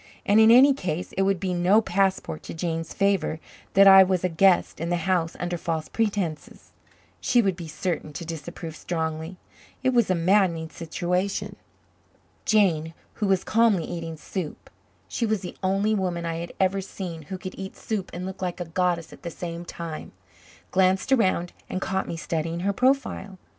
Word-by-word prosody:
And, 205 +2 +5
in 220 0 +7
any 260 +4 +8
case, 180 - -4
it 195 - -1
would 195 -1 +2
be 185 0 -1
no 180 +4 +4
passport 190 - 0
to - - -8
Jane's 165 -1 -3
favor 195 -5 +1 0.4
that 195 +1 +8
I 195 0 +10
was 185 -1 +2
a 185 - +2
guest 180 +2 +3
in 165 +2 -2
the 175 - +2
house 175 -3 +1
under 175 -1 -2
false 160 -1 -3
pretences. 200 -8 -3 0.5
She 245 - +2
would 195 -5 +2
be 170 -2 -8
certain 155 0 -3
to 170 - -6
disapprove 165 0 -7
strongly. 160 +1 -3 0.5
It 260 - +3
was 235 -5 +3
a 185 - +3
maddening 170 -2 +2
situation. 180 +3 -2 0.9
Jane, 165 -7 +2 0.3
who 210 - +2
was 190 -1 +2
calmly 225 -6 +3
eating 165 -2 -5
soup 165 0 -6 0.4
she 230 - -1
was 215 -3 0
the 180 - -7
only 195 +3 +1
woman 180 -4 -1
I 165 0 -2
had 170 +1 -5
ever 190 +1 +2
seen 180 -3 -6
who 190 - -4
could 185 0 -7
eat 195 0 -7
soup 210 -4 -3
and 180 +1 -5
look 190 0 -7
like 180 -1 -3
a 175 - -3
goddess 175 0 -1
at - - -14
the 170 - -5
same 170 0 -6
time 165 -2 -7 0.6
glanced 190 +6 +2
around 185 -8 +2 0.2
and 185 - -2
caught 190 0 -2
me 165 - -4
studying 165 +1 -2
her 200 +2 0
profile. 255 -5 0
180 Hz, 180 wpm, -25 LUFS, 165-195 Hz, 0.9 s, I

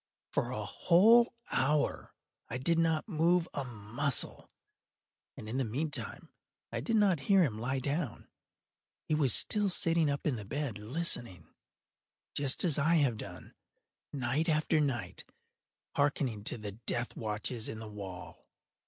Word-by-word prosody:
For - - 0
a - - -3
whole 230 +8 +5 0.2
hour 145 +3 +1 0.3
I 125 - -2
did 165 +6 +1
not 160 +1 +1
move 170 -1 +2
a 140 - -1
muscle, 120 +3 -1 0.9
and 110 - -8
in 115 +4 -3
the 135 - +1
meantime 140 +7 -3 0.4
I - - -2
did 230 - -1
not 200 -6 +4
hear 195 -2 +6
him 110 -9 -1
lie 130 +4 -1
down. 140 +1 -3 0.8
He - - 0
was 145 -5 +3
still 210 -2 +3
sitting 165 -3 +2
up 140 0 -2
in 140 -6 +1
the 105 - -6
bed 125 0 -3
listening;—just 130 - -3
as 160 -5 +2
I 160 +4 +3
have 135 -8 +2
done, - - -9 0.6
night 140 +5 -1
after 155 +1 +2
night, 135 -6 -2 0.7
hearkening 140 -7 0
to - - -1
the 105 -2 -6
death 120 +3 -3
watches 110 +1 -2
in 110 - -5
the 110 0 -8
wall. 95 -4 -9
140 Hz, 145 wpm, -32 LUFS, 115-165 Hz, 0.9 s, hear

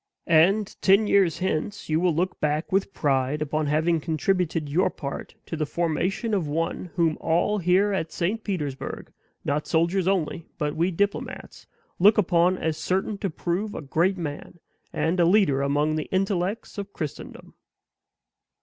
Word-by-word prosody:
And 190 +6 +3
ten 200 +3 +5
years 195 -6 +3
hence 190 +2 -2
you 155 0 +1
will 175 -2 +2
look 180 +3 -1
back 150 +1 -1
with 195 +1 +1
pride 140 -3 0
upon 155 0 -1
having 160 +3 +2
contributed 165 0 0
your 165 +7 +2
part 140 -1 -7
to - - -5
the 155 -2 -2
formation 175 +8 -1
of 185 -7 0
one 165 +5 -2
whom 165 -3 +1
all 175 +6 +1
here 190 +3 +3
at 165 -4 -2
St. 205 +6 -2
Petersburg, 150 -10 -4 0.3
not 150 +1 -1
soldiers 170 +3 +1
only, 170 -4 -1
but 150 -2 -2
we 170 +3 +1
diplomates, 200 +3 -3 0.3
look 205 +4 +6
upon 180 -2 +3
as 160 -3 -2
certain 195 +2 -1
to 195 - -1
prove 180 +6 -3
a - - -4
great 170 +7 +1
man, 155 0 -6 0.3
and 170 +3 0
a 170 - +5
leader 170 -7 +3
among 145 +2 +1
the 155 - -2
intellects 195 +2 -1
of 200 0 -7
Christendom." 155 -5 -7
170 Hz, 160 wpm, -25 LUFS, 155-195 Hz, 0.3 s, look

